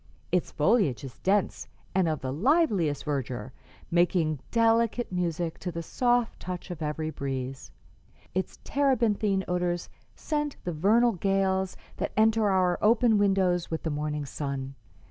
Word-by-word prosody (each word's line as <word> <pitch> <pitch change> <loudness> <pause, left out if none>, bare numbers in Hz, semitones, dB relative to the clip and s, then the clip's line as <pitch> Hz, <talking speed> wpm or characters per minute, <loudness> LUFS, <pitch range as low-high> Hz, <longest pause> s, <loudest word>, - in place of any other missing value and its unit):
Its 180 -1 +1
foliage 150 - +2
is 130 -3 -9
dense 200 +1 0 0.3
and 185 -3 +2
of 155 -2 -2
the 130 - -3
liveliest 195 - +2
verdure, 130 -3 -3 0.4
making 170 -3 +2
delicate 230 0 +2
music 170 -2 -2
to 180 - -4
the 170 0 -5
soft 245 +5 +1
touch 180 0 -6
of 170 -2 -7
every 155 +1 -2
breeze. 135 -2 -5 0.6
Its 185 +1 -2
terebinthine 225 -8 +1
odors 175 -1 -1 0.3
scent 295 -2 -2
the 175 - -3
vernal 220 +9 +4
gales 190 -1 0 0.2
that - - -3
enter 220 -1 +4
our 185 -2 +2
open 220 0 +4
windows 190 -3 +2
with 160 - -3
the 160 - -1
morning 150 0 -2
sun. 135 -1 -4
180 Hz, 140 wpm, -28 LUFS, 155-215 Hz, 0.6 s, vernal